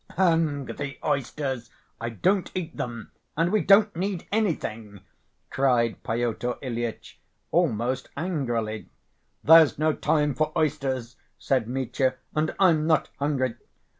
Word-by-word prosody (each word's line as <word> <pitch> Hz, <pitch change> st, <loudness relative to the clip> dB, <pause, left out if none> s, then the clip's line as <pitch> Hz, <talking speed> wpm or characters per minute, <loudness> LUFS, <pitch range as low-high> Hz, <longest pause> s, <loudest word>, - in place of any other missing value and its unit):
"Hang 165 Hz, -6 st, +2 dB
the 140 Hz, 0 st, -6 dB
oysters. 135 Hz, -3 st, -2 dB, 0.3 s
I 115 Hz, -, -3 dB
don't 185 Hz, -, +1 dB
eat 170 Hz, -3 st, -4 dB
them. 115 Hz, -3 st, -5 dB, 0.3 s
And 165 Hz, +2 st, +2 dB
we 215 Hz, -1 st, +3 dB
don't 205 Hz, 0 st, +5 dB
need 185 Hz, 0 st, -3 dB
anything," 115 Hz, -, -2 dB, 0.5 s
cried 125 Hz, -4 st, +1 dB
Pyotr 120 Hz, +1 st, -2 dB
Ilyitch, 120 Hz, -3 st, -5 dB, 0.3 s
almost 130 Hz, -6 st, 0 dB
angrily. 120 Hz, -10 st, -2 dB, 0.5 s
"There's 160 Hz, -1 st, +7 dB
no 155 Hz, +1 st, +2 dB
time 150 Hz, -2 st, +1 dB
for 155 Hz, +3 st, 0 dB
oysters," 135 Hz, -6 st, -1 dB, 0.2 s
said 130 Hz, -5 st, 0 dB
Mitya. 130 Hz, +1 st, -1 dB, 0.2 s
"And 155 Hz, +1 st, 0 dB
I'm 165 Hz, -5 st, +4 dB
not 155 Hz, -2 st, +2 dB
hungry. 135 Hz, -4 st, 0 dB
140 Hz, 120 wpm, -26 LUFS, 120-165 Hz, 0.5 s, There's